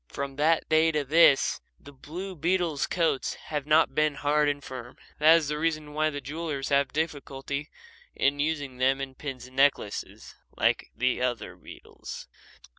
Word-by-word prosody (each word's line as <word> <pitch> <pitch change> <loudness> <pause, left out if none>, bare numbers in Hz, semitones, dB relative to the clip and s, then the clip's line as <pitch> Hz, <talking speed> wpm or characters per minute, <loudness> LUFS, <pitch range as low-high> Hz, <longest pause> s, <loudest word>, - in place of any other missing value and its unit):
From 140 -1 -5
that 160 +2 +2
day 160 +1 +4
to 150 -1 +1
this 145 0 +4 0.2
the 145 - -13
blue 180 +8 -7
beetles' 165 -3 0
coats 165 -6 0
have 150 -2 -5
not 155 +1 +4
been 155 -1 +1
hard 150 +1 +2
and 145 -1 -3
firm. 125 -2 -9 0.2
That 155 +2 +7
is 160 -3 -1
the 150 +1 -2
reason 155 -2 -2
why 155 +1 +1
the 145 -1 -5
jewellers 145 -1 -4
have 140 -1 +2
difficulty 145 -2 -3 0.5
in 140 +1 +1
using 145 -4 -2
them 135 +1 +2
in 135 -1 -5
pins 130 -2 -7
and 130 0 -16
necklaces 135 -7 0 0.2
like - - +1 0.3
other 125 -2 -2
beetles. - - -10
145 Hz, 160 wpm, -27 LUFS, 135-155 Hz, 0.5 s, That